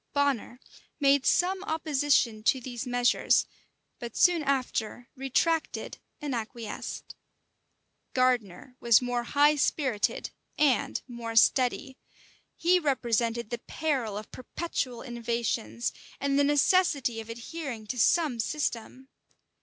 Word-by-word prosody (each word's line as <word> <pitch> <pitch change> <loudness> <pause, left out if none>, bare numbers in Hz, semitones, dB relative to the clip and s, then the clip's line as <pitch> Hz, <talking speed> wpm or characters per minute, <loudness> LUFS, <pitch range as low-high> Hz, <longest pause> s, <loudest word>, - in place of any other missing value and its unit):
Bonner 280 -4 0 0.4
made 280 -1 +3
some 375 +2 +2
opposition 290 - +1
to 260 +4 +2
these 245 0 -6
measures; 245 0 +2 0.5
but 235 -2 -7
soon 350 -2 +4
after 250 -4 -2
retracted 285 +5 -1 0.2
and 290 -3 -4
acquiesced. 225 -1 -6 1.0
Gardiner 250 -1 0
was 235 -3 +5
more 245 -1 -1
high 290 +3 +4
spirited 265 -7 0 0.3
and 290 -4 +2
more 235 -2 -6
steady. 255 +3 +3 0.6
He 360 +2 +3
represented 235 -6 0
the 240 - -3
peril 260 -9 -2
of 215 - -8
perpetual 255 -2 -4
innovations, 235 - -2 0.3
and 280 0 +1
the - - +5
necessity 285 -5 +2
of 220 - -12
adhering 240 0 -6
to 245 +4 -4
some 295 -1 +3
system. 260 0 -3
255 Hz, 110 wpm, -28 LUFS, 235-290 Hz, 1.0 s, was